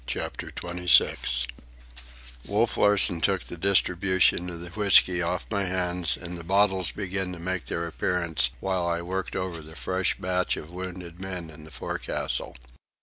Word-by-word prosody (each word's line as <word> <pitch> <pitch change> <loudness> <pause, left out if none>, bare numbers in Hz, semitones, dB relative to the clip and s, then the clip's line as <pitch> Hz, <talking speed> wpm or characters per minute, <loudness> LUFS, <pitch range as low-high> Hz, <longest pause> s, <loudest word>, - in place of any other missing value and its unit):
CHAPTER - - -3
XXVI 85 -8 +2 1.0
Wolf 110 +3 +1
Larsen 95 -5 +3
took 95 0 +1
the - - -8
distribution 95 -1 +3
of 85 -1 -7
the 85 - -8
whisky 95 -2 +5
off 90 +1 -1
my 100 -2 0
hands, 90 -2 -1
and 85 0 -7
the - - -8
bottles 95 0 +3
began 95 -2 -3
to - - -7
make 95 +1 -3
their 85 - -3
appearance 85 0 0
while 95 -2 0
I 85 0 -1
worked 95 +2 -4
over 90 -3 -3
the 80 +1 -12
fresh 95 +6 0
batch 90 0 0
of 75 - -8
wounded 90 -1 -7
men 90 -4 -5
in 75 0 -13
the - - -12
forecastle. - - -3
90 Hz, 155 wpm, -26 LUFS, 85-95 Hz, 1.0 s, whisky